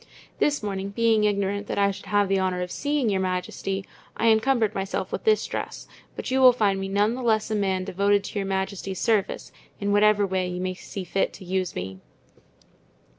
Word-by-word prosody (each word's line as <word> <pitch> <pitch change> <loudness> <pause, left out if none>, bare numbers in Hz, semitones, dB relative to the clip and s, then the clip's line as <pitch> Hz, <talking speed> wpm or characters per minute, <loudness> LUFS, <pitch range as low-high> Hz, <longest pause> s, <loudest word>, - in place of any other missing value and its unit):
This 290 -5 +1
morning, 195 -1 -3
being 220 0 +2
ignorant 200 0 0
that - - -3
I 200 0 +3
should 195 - -10
have 205 -1 +2
the 195 0 +2
honor 185 -1 0
of 180 - -6
seeing 290 -3 0
your 195 -3 +1
majesty, 190 +1 -2 0.3
I 230 - +3
encumbered 220 -1 +3
myself 195 -2 -3
with - - -4
this 435 -1 +3
dress, - - -5 0.3
but - - -5
you 265 0 +2
will 255 -1 +8
find 205 -5 +1
me 195 - -3
none 205 +3 +2
the 255 - -5
less 220 -2 +1
a - - +1
man 190 -2 0
devoted 200 +2 +1
to 205 - -4
your 195 - -2
majesty's 190 0 -3
service, 215 -4 0 0.3
in 200 0 -1
whatever 205 0 +4
way 185 -1 -1
you 180 0 -4
may 185 0 -2
see 190 +1 -7
fit 195 +2 -1
to 190 - -11
use 185 0 -2
me." 95 +1 -5
200 Hz, 205 wpm, -25 LUFS, 190-215 Hz, 0.3 s, will